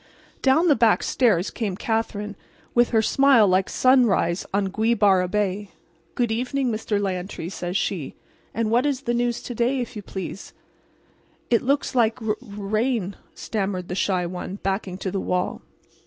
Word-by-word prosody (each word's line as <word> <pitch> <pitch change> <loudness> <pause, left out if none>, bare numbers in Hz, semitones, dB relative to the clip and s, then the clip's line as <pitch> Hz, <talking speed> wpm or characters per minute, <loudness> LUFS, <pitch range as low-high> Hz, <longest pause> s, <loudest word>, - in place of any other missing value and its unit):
Down 275 +6 +4
the 295 - +5
back 230 -2 +3
stairs 210 -8 +2
came 200 -5 -3
Katherine 210 -2 -2 0.4
with 240 0 +4
her 220 -2 +2
smile 270 -4 +5
like 185 0 +2
sunrise 235 -9 +3
on 195 0 0
Gweebarra 205 -4 +3
Bay. 205 0 -1 0.5
"Good 240 -2 0
evening, 250 +2 -1
Mr. 215 -1 -1
Lantry," 185 -3 -3
says 180 0 -3
she. 170 -10 -3 0.4
"And 225 -1 -1
what 245 +5 +3
is 275 -3 -1
the 240 -3 -1
news 240 0 -1
to 245 - -5
day, 245 +3 +1
if 245 -1 -5
you 210 - -5
please?" 190 0 -7 1.0
"It 235 - +4
looks 280 +3 0
like 235 -1 +2
r 220 -2 -1
rain," 215 -1 -2 0.2
stammered 195 -4 -3
the - - -3
shy 185 -1 0
one, 180 +2 -5
backing 190 -1 -2
to 190 -1 -4
the 195 - -2
wall. 180 0 -1
215 Hz, 160 wpm, -24 LUFS, 190-240 Hz, 1.0 s, the